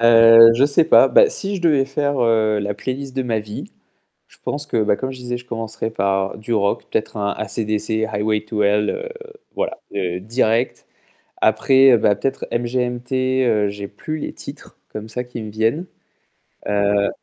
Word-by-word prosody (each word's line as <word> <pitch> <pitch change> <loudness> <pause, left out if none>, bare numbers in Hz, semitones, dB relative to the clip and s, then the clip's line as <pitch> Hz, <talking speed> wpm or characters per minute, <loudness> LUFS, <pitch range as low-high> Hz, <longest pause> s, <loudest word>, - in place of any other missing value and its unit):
Heu, 115 0 +8
he 135 +4 +3
sais 145 +3 +3
pas. - - +6
Bah, - - +5
si 200 - -1
je - - -7
devais 150 -5 +3
faire, 140 0 -2
heu, 110 -2 +2
la 100 0 -3
playlist 130 +5 -5
de 130 - -1
ma 115 -3 -1
vie, 105 0 -7 0.6
je - - -21
pense 145 +1 -3
que, 115 -6 0
bah, 105 - +1
comme 130 +3 -4
je 130 - -10
disais, 125 0 -4
je 120 - -14
commencerais 115 -1 -5
par 100 -2 -1
du 110 +2 -5
rock, 100 -2 0
peut-être - - -2
un 100 -1 -1
AC/DC, 110 +1 -2
Highway 105 0 -1
to 105 -1 -2
Hell, 105 +1 +2
heu, 480 - -5 0.5
voilà, 335 - -3 0.4
direct. 115 +3 -1 0.6
Après, 130 +3 +5
bah, 105 -1 +2
peut-être 135 +6 -3
MGMT, 125 +2 -1
heu, 105 -3 +1
j'ai 100 0 -7
plus 155 +10 -6
les - - -5
titres - - -11
comme 110 +1 -8
ça 125 +3 -4
qui 125 -1 -8
me 110 -1 -7
viennent. 115 - -1 0.8
Heu 100 0 +1
115 Hz, 180 wpm, -20 LUFS, 105-130 Hz, 0.8 s, Heu